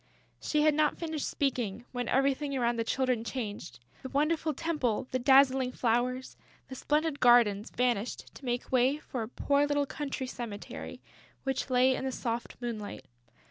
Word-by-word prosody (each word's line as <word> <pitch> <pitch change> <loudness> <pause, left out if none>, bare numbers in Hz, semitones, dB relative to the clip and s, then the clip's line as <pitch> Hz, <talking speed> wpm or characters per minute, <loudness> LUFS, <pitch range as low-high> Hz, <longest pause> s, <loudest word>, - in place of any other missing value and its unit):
She 300 -1 +1
had 310 0 +5
not 305 0 +2
finished 320 -3 -3
speaking, 240 -5 -2
when 245 -2 -3
everything 275 +1 +1
around 240 -1 +1
the 230 - +1
Children 255 -1 0
changed. 205 - -5 0.2
The 260 - -6
wonderful 310 +3 +1
temple, 290 -7 -1
the 255 - 0
dazzling 265 0 +5
flowers, 250 +2 0 0.3
the - - -7
splendid 300 +3 0
gardens 235 -4 +5
vanished 245 -2 -1
to - - -14
make 245 0 -2
way 260 +3 +3
for 260 -5 -5
a 220 - -3
poor 285 +3 +1
little 290 0 +1
country 275 -2 -4
cemetery, 235 -5 -7 0.4
which 270 0 -2
lay 255 +1 +4
in - - -4
the 265 - -1
soft 235 -1 -3
moonlight. 230 -4 -5
255 Hz, 160 wpm, -30 LUFS, 240-285 Hz, 0.4 s, had